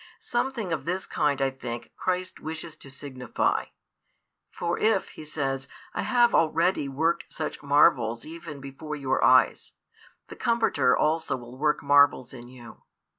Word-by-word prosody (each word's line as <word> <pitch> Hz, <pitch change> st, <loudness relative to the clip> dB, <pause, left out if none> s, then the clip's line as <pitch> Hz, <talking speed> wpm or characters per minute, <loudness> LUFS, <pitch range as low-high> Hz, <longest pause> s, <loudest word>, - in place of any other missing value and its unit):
Something 240 Hz, -7 st, -2 dB
of 165 Hz, -, -3 dB
this 180 Hz, +3 st, -1 dB
kind, 145 Hz, -2 st, 0 dB
I 135 Hz, -, +1 dB
think, 120 Hz, -3 st, -7 dB
Christ 185 Hz, 0 st, -2 dB
wishes 160 Hz, 0 st, -6 dB
to 140 Hz, -, -13 dB
signify. 130 Hz, -2 st, -2 dB, 0.8 s
For 170 Hz, 0 st, -3 dB
if, 215 Hz, -3 st, +2 dB
He -, -, -11 dB
says, 135 Hz, -3 st, -2 dB, 0.3 s
I -, -, -2 dB
have 240 Hz, -2 st, +3 dB
already 165 Hz, -2 st, +2 dB
worked 160 Hz, +5 st, -1 dB
such 155 Hz, -, -5 dB
marvels 125 Hz, -5 st, +3 dB
even 160 Hz, -2 st, -8 dB
before 140 Hz, +3 st, -7 dB
your 135 Hz, -2 st, -1 dB
eyes, 130 Hz, 0 st, +4 dB, 0.5 s
the -, -, -10 dB
Comforter 225 Hz, -, +2 dB
also 160 Hz, -1 st, +1 dB
will 120 Hz, 0 st, -11 dB
work 150 Hz, +2 st, 0 dB
marvels 145 Hz, -3 st, +4 dB
in 120 Hz, -2 st, -10 dB
you. 125 Hz, -2 st, -13 dB
150 Hz, 145 wpm, -26 LUFS, 130-170 Hz, 0.8 s, eyes